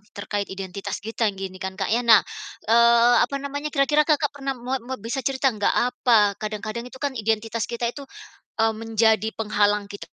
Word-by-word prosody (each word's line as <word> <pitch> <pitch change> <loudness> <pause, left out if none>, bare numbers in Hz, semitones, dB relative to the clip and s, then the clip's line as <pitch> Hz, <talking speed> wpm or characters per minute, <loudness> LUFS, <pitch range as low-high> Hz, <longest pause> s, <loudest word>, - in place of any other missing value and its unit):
terkait 205 0 -3
identitas 190 0 -5
kita 225 +1 -1
gini, 190 -1 -7
kan 190 -1 -4
Kak, 195 - -2
ya. 235 - +2
Nah, 225 -3 +8 0.5
eee, 235 +1 +5
apa 280 - -6
namanya, 285 +2 -4
kira-kira 295 +1 +3
Kakak 300 -2 +2
pernah 275 -1 -3
moa 250 +2 -3
moa 260 +3 -6
bisa 235 +6 -4
cerita 270 +1 +1
enggak, 205 -1 0
apa, 235 -4 +3
kadang-kadang 215 +2 -5
itu 260 - -12
kan 285 -1 -1
identitas 225 -1 -1
kita 235 0 -3
itu, 285 - -9 0.6
eee 225 0 +3
menjadi 220 -1 +1
penghalang 205 -1 0
kita. 205 - -8
225 Hz, 175 wpm, -23 LUFS, 210-260 Hz, 0.6 s, Nah